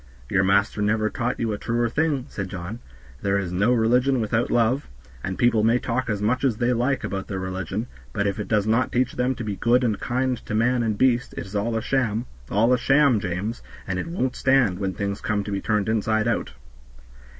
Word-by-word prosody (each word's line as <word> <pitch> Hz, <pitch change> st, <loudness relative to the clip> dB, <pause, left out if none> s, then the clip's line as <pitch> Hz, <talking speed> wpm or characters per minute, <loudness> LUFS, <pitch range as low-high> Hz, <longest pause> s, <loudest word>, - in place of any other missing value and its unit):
"Your 95 Hz, -1 st, +3 dB
master 100 Hz, +2 st, +2 dB
never 110 Hz, +1 st, +1 dB
taught 120 Hz, +1 st, -2 dB
you 115 Hz, -2 st, 0 dB
a 105 Hz, -, -4 dB
truer 120 Hz, +1 st, 0 dB
thing," 145 Hz, +1 st, 0 dB
said 100 Hz, -2 st, -5 dB
John; 95 Hz, +5 st, -6 dB, 0.4 s
"there 100 Hz, 0 st, +1 dB
is 95 Hz, -3 st, -2 dB
no 100 Hz, +6 st, +2 dB
religion 125 Hz, +3 st, +3 dB
without 115 Hz, +1 st, 0 dB
love, 120 Hz, +4 st, +1 dB, 0.3 s
and 95 Hz, 0 st, -3 dB
people 120 Hz, -3 st, +3 dB
may 115 Hz, +2 st, +4 dB
talk 125 Hz, 0 st, -2 dB
as 105 Hz, -2 st, -1 dB
much 125 Hz, +6 st, +1 dB
as 125 Hz, -6 st, +2 dB
they 120 Hz, +2 st, +2 dB
like 125 Hz, +3 st, 0 dB
about 95 Hz, -1 st, -4 dB
their 95 Hz, -, -4 dB
religion, 95 Hz, +3 st, -3 dB, 0.3 s
but 100 Hz, -2 st, -1 dB
if 100 Hz, +1 st, -1 dB
it 105 Hz, -, -4 dB
does 105 Hz, -1 st, +2 dB
not 115 Hz, +4 st, +1 dB
teach 125 Hz, +1 st, +1 dB
them 125 Hz, +1 st, 0 dB
to 120 Hz, -, -5 dB
be 105 Hz, -2 st, -3 dB
good 125 Hz, +2 st, +3 dB
and 110 Hz, -4 st, 0 dB
kind 125 Hz, 0 st, -1 dB
to 110 Hz, -, -2 dB
man 120 Hz, +3 st, +2 dB
and 110 Hz, -3 st, 0 dB
beast 125 Hz, 0 st, +2 dB
it -, -, -4 dB
is 100 Hz, +2 st, -10 dB
all 110 Hz, +3 st, 0 dB
a 110 Hz, -, -3 dB
sham 120 Hz, -4 st, 0 dB, 0.2 s
all 115 Hz, +5 st, +3 dB
a 125 Hz, -, +2 dB
sham, 135 Hz, -2 st, +4 dB
James, 95 Hz, +5 st, -3 dB, 0.3 s
and 95 Hz, -1 st, -2 dB
it -, -, -4 dB
won't 150 Hz, -7 st, -2 dB
stand 130 Hz, -9 st, +2 dB
when 95 Hz, -2 st, -1 dB
things 100 Hz, +1 st, -3 dB
come 105 Hz, -2 st, -1 dB
to 105 Hz, -, -6 dB
be 100 Hz, -1 st, -2 dB
turned 105 Hz, -2 st, 0 dB
inside 110 Hz, 0 st, +1 dB
out." 115 Hz, -, -1 dB
110 Hz, 225 wpm, -24 LUFS, 100-125 Hz, 0.4 s, may